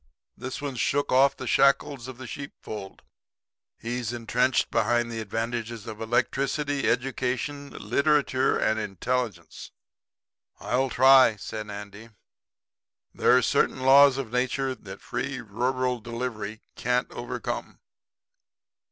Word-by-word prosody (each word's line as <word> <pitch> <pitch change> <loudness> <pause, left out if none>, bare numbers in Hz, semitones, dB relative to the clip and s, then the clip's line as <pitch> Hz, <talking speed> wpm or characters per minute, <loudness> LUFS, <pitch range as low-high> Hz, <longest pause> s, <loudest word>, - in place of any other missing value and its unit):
'This 130 +1 -6
one's 135 -4 -4
shook 145 +5 0
off 135 +2 +4
the 130 - -6
shackles 135 -1 +2
of 130 -2 -8
the 130 - -8
sheep 140 +3 -7
fold. 100 -3 -8 0.7
He's 120 -1 -3
entrenched 120 +2 +1
behind 120 -1 +1
the 115 - -4
advantages 115 +1 -4
of 110 0 -8
electricity, 135 +5 0
education, 130 +3 -2
literature 135 +3 +1
and 110 0 +1
intelligence.' 105 -2 -3 0.9
"'I'll 130 +2 0
try,' 130 -2 +6
said 105 +1 -7
Andy. 105 +2 -9 1.0
'There 125 - +4
are - - +4
certain 130 - +1
Laws 135 +1 +7
of 130 -5 -4
Nature 130 +2 0
that 100 -5 -11
Free 130 +2 -4
Rural 125 +3 -1
Delivery 115 -2 -5
can't 125 +1 0
overcome.' 120 0 -5
125 Hz, 115 wpm, -26 LUFS, 115-130 Hz, 1.0 s, Laws